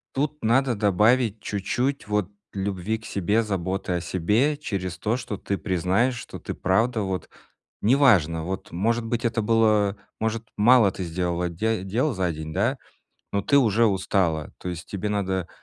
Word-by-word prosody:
тут 150 Hz, +2 st, -1 dB
надо 125 Hz, +2 st, +3 dB
добавить 105 Hz, +2 st, +2 dB
чуть-чуть 120 Hz, +7 st, -2 dB
вот 105 Hz, -3 st, 0 dB, 0.2 s
любви 100 Hz, +2 st, -2 dB
к 115 Hz, -, -14 dB
себе, 100 Hz, +4 st, +1 dB
заботы 95 Hz, -2 st, -2 dB
о 90 Hz, -, +1 dB
себе 105 Hz, -, +1 dB
через 95 Hz, -, -4 dB
то, 110 Hz, +3 st, 0 dB
что 120 Hz, -4 st, -5 dB
ты 100 Hz, 0 st, -3 dB
признаешь, 95 Hz, +7 st, +1 dB
что -, -, -8 dB
ты -, -, -5 dB
правда 110 Hz, +5 st, +1 dB
вот 95 Hz, -2 st, -3 dB, 0.5 s
неважно, 105 Hz, -, +4 dB
вот 95 Hz, +3 st, -5 dB
может 115 Hz, +7 st, 0 dB
быть, 120 Hz, +1 st, -2 dB
это 115 Hz, -1 st, +1 dB
было, 105 Hz, -2 st, +3 dB, 0.2 s
может, 110 Hz, 0 st, -1 dB
мало 115 Hz, -1 st, +6 dB
ты 95 Hz, -, -5 dB
сделала 90 Hz, +1 st, -1 dB
де 105 Hz, +4 st, -1 dB
дел 120 Hz, +10 st, 0 dB
за 95 Hz, -5 st, -1 dB
день, 80 Hz, 0 st, -6 dB
да, -, -, +1 dB, 0.6 s
но 100 Hz, -, +1 dB
ты 140 Hz, +8 st, +3 dB
уже 115 Hz, -3 st, +4 dB
устала, 95 Hz, -6 st, 0 dB
то 90 Hz, -, -5 dB
есть 85 Hz, -1 st, -7 dB
тебе 100 Hz, +1 st, -3 dB
надо 95 Hz, -3 st, -1 dB
105 Hz, 165 wpm, -25 LUFS, 95-115 Hz, 0.6 s, мало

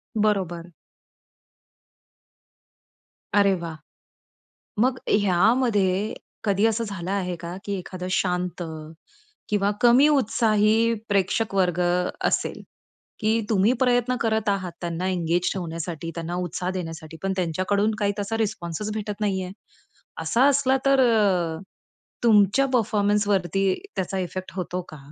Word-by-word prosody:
बरोबर. 185 Hz, -5 st, 0 dB, 2.6 s
अरे 200 Hz, -1 st, +5 dB
वाह! 165 Hz, -2 st, -5 dB, 1.1 s
मग 255 Hz, +1 st, +2 dB
ह्यामध्ये 205 Hz, 0 st, +2 dB, 0.3 s
कधी 200 Hz, 0 st, +2 dB
असं 225 Hz, +1 st, 0 dB
झालं 195 Hz, -3 st, -5 dB
आहे 180 Hz, -3 st, -1 dB
का, 170 Hz, +1 st, -7 dB
की 200 Hz, -, -2 dB
एखादं 180 Hz, 0 st, -7 dB
शांत 180 Hz, -1 st, -1 dB, 0.9 s
किंवा 205 Hz, -1 st, +2 dB
कमी 245 Hz, +5 st, +6 dB
उत्साही 225 Hz, -3 st, +3 dB, 0.2 s
प्रेक्षक 200 Hz, +2 st, +1 dB
वर्ग 180 Hz, -2 st, +2 dB, 0.5 s
असेल, -, -, 0 dB, 0.6 s
की 225 Hz, +1 st, +1 dB
तुम्ही 215 Hz, +3 st, +3 dB
प्रयत्न 250 Hz, 0 st, +2 dB
करत 220 Hz, -2 st, +1 dB
आहात 185 Hz, -3 st, -1 dB
त्यांना 175 Hz, +2 st, -2 dB
एंगेज 175 Hz, -1 st, 0 dB
ठेवण्यासाठी 165 Hz, -2 st, -5 dB
त्यांना 170 Hz, +1 st, -4 dB
उत्साह 180 Hz, 0 st, -3 dB
देण्यासाठी 165 Hz, -3 st, -6 dB
पण 195 Hz, 0 st, 0 dB
त्यांच्याकडून 185 Hz, +5 st, 0 dB
काही 205 Hz, -1 st, +1 dB
तसा 225 Hz, +3 st, -2 dB
रिस्पॉन्स 205 Hz, -2 st, -3 dB
भेटत 210 Hz, -1 st, -5 dB
नाहीये. 190 Hz, -3 st, -1 dB, 0.7 s
असा 250 Hz, +4 st, +3 dB
असला 270 Hz, -1 st, +3 dB
तर 275 Hz, -1 st, +4 dB
अ, 195 Hz, -9 st, +2 dB, 0.6 s
तुमच्या 215 Hz, +3 st, +5 dB
परफॉर्मन्सवरती 205 Hz, -4 st, +1 dB, 0.2 s
त्याचा 190 Hz, +1 st, -2 dB
इफेक्ट 185 Hz, +1 st, -5 dB
होतो 180 Hz, 0 st, -3 dB
का? 155 Hz, -, -10 dB
195 Hz, 110 wpm, -24 LUFS, 180-220 Hz, 2.6 s, कमी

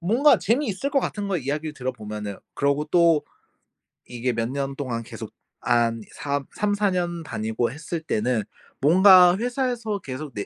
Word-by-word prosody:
뭔가 235 Hz, -, +4 dB
재미있을 250 Hz, +1 st, -1 dB
것 275 Hz, -, +3 dB
같은 205 Hz, -5 st, -3 dB
거예요, 180 Hz, -8 st, -1 dB
이야기를 150 Hz, +2 st, -3 dB
들어보면은. 105 Hz, -6 st, -5 dB, 0.2 s
그러고 140 Hz, +1 st, +1 dB
또 165 Hz, -2 st, +4 dB, 0.9 s
이게 120 Hz, 0 st, -2 dB
몇 115 Hz, +1 st, -2 dB
년 140 Hz, 0 st, -3 dB
동안 120 Hz, -5 st, -4 dB
계속 -, -, -9 dB, 0.3 s
한 115 Hz, -1 st, +1 dB
삼 140 Hz, -1 st, -3 dB
삼사 205 Hz, -1 st, +1 dB
년 175 Hz, -2 st, -2 dB
다니고 110 Hz, -2 st, -2 dB
했을 160 Hz, +3 st, -5 dB
때는 120 Hz, -6 st, -1 dB, 0.4 s
뭔가 180 Hz, +3 st, +7 dB
회사에서 240 Hz, -3 st, -2 dB
계속 135 Hz, -1 st, -7 dB
내 100 Hz, -, -4 dB
150 Hz, 310 characters per minute, -24 LUFS, 125-195 Hz, 0.9 s, 뭔가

